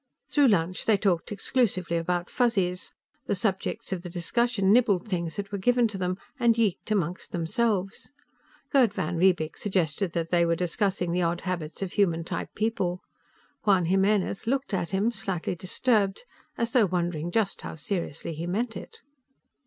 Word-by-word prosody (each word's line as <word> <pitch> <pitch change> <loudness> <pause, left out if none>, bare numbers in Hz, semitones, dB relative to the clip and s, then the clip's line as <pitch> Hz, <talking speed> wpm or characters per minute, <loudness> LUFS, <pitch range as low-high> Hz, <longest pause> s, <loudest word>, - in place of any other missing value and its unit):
Through 290 -2 +4
lunch, 185 -4 +1
they 220 -2 +4
talked 190 -3 0
exclusively 200 -5 0
about 175 +1 -1
Fuzzies. 195 -7 0 0.4
The - - +1
subjects 190 -1 -2
of 180 - -3
the 175 - -7
discussion 195 +3 +1
nibbled 220 -6 +3
things 170 -5 -2
that 200 -1 -5
were 200 - -3
given 245 +4 +3
to 205 - -6
them, 180 0 -1 0.2
and 235 -2 +4
yeeked 215 -2 0
among 185 -4 0
themselves. 195 +3 -1 0.6
Gerd 245 -8 +4
van 170 +2 -2
Riebeek 175 -3 +2
suggested 180 -2 0
that 165 -1 -2
they 175 -1 +4
were 170 0 +2
discussing 180 +1 0
the 180 +1 +1
odd 170 0 0
habits 175 -2 -4
of 185 - -5
human 170 -5 +2
type - - -4
people. 195 -5 -1 0.6
Juan 190 -4 +4
Jimenez 195 +3 +1
looked 270 -2 -1
at 175 -3 -1
him, 200 +4 +1
slightly 195 -6 -3
disturbed, 195 - 0 0.3
as 230 0 -1
though 235 -6 +5
wondering 175 -2 -1
just 200 +1 0
how - - -6
seriously 165 -1 -4
he 165 +3 -5
meant 225 +6 -1
it. 455 - -10
190 Hz, 165 wpm, -27 LUFS, 175-215 Hz, 0.6 s, though